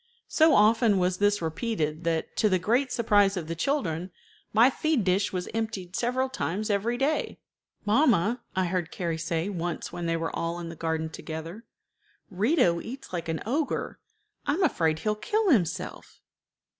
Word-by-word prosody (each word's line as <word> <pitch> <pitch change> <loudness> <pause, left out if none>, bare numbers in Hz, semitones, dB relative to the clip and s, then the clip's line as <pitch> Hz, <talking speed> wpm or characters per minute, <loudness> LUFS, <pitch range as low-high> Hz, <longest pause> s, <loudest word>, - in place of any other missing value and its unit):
So 315 -1 +5
often 215 0 +4
was 180 0 +1
this 205 -2 +2
repeated 160 -3 -2
that, 165 -1 -1
to 215 - +3
the 185 - +3
great 245 +8 +1
surprise 205 -5 +3
of 165 -3 -4
the 165 - -2
children, 180 - -1 0.4
my 230 +5 +5
feed 310 -4 0
dish 190 +2 +1
was 180 -1 -3
emptied 220 -5 -3
several 250 +2 0
times 215 -3 -2
every 220 +4 0
day. 280 +4 -1 0.5
"Mamma," 225 - +3
I 185 -1 +2
heard 175 -2 -1
Carrie 170 -3 -3
say 165 +2 -1
once 175 -3 -4
when 170 -1 -3
they 165 0 +1
were 165 0 -3
all 170 +1 -2
in 170 -1 -6
the 165 - -8
garden 160 -1 -2
together, 165 +8 -7 0.7
"Rito 190 - +2
eats 265 -3 -9
like 170 -2 -3
an 160 - -2
ogre. 280 +6 -2 0.5
I 285 - +2
am 375 - 0
afraid 160 - +2
he'll 210 +6 0
kill 405 - +1
himself." 180 - -1
195 Hz, 170 wpm, -27 LUFS, 170-235 Hz, 0.7 s, So